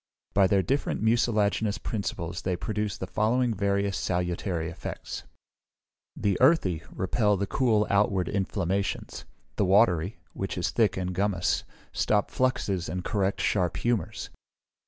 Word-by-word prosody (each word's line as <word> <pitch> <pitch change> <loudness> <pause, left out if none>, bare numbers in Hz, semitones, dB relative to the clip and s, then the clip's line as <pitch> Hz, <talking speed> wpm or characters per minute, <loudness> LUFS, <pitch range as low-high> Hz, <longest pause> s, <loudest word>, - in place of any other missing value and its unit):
By 100 -1 +5
their 95 0 +3
different 135 -2 -1
mucilaginous 110 -2 +2
principles 90 -5 -4
they 95 -1 -1
produce 105 +2 -3
the - - -4
following 115 +5 +1
various 100 0 0
salutary 90 -1 -1
effects: 85 +1 -6 0.9
The 100 -3 0
earthy 125 - +4
repel 105 +2 +1
and 100 +1 -1
cool 110 -4 +2
outward 100 -3 +2
inflammations. 100 0 -2 0.3
The 100 - +3
watery, 95 -2 +3 0.2
which 95 -1 -4
is 90 - 0
thick 105 -6 +2
and 90 -1 -2
gummose, 95 -1 0 0.3
stop 105 -1 +1
fluxes 100 -8 0
and 90 0 -3
correct 100 -2 0
sharp 90 -4 +1
humours. 120 -3 -2
100 Hz, 130 wpm, -27 LUFS, 90-105 Hz, 0.9 s, By